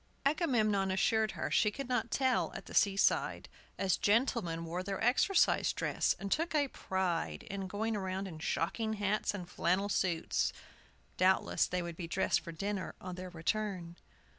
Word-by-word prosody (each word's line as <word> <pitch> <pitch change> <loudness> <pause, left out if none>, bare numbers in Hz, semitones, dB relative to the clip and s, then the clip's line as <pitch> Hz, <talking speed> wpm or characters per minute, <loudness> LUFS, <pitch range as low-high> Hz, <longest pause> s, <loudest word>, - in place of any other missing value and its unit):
Agamemnon 230 - +2
assured 220 +3 +2
her - - -3
she 210 - +4
could 275 +5 -6
not 245 -2 0
tell 260 +1 +1
at - - -7
the - - -11
seaside, 200 -1 +2 0.3
as 190 -2 +1
gentlemen 205 -7 +1
wore 170 +2 -3
their 195 +1 -4
exercise 260 - +3
dress, - - 0
and 200 0 -5
took 330 0 0
a 285 -2 +2
pride 175 - -2
in 195 -1 -5
going 220 +3 -2
around 190 -1 -3
in 160 -4 -8
shocking 220 +7 -1
hats 205 0 0
and 180 -3 -6
flannel 185 +3 0
suits. 175 -4 0 0.6
Doubtless 185 +1 +3
they 180 -1 -2
would 170 -1 -6
be 175 - -5
dressed 185 +3 +1
for 170 - -7
dinner 195 +4 -3
on 185 0 -6
their 180 +1 -6
return. 180 0 -2
195 Hz, 165 wpm, -33 LUFS, 180-220 Hz, 0.6 s, she